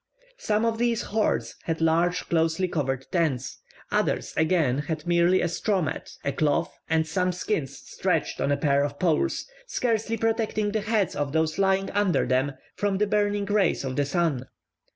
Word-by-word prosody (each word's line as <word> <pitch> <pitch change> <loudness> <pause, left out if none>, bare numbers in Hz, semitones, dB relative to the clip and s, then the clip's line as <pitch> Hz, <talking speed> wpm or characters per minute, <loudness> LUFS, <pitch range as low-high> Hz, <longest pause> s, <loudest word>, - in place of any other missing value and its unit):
Some 215 - +1
of 225 -1 0
these 235 -1 +1
hordes 215 +1 0
had 165 -1 -1
large 170 +2 +2
closely 165 +2 +1
covered 135 -6 -2
tents; 155 -9 -1 0.3
others - - 0
again 160 -5 +2
had 155 +1 -4
merely 175 +1 +3
a - - +1
straw 195 +4 0
mat, 155 -6 -3 0.2
a 140 - +1
cloth, 145 0 0 0.2
or 160 0 +3
some 180 +3 0
skins 175 - -2
stretched - - -2
on 140 - +1
a 140 - +2
pair 140 -1 +2
of 145 0 -3
poles, 165 -3 +1 0.2
scarcely 225 - 0
protecting 220 -2 0
the 215 0 0
heads 210 -2 0
of 145 -1 -2
those 160 +1 0
lying 195 0 +2
under 200 -7 +2
them 130 +3 +1 0.2
from 200 -1 0
the 210 - +2
burning 205 0 +1
rays 200 -6 +1
of 130 -1 -3
the 145 - +1
sun. 140 -4 0
175 Hz, 175 wpm, -26 LUFS, 150-205 Hz, 0.3 s, merely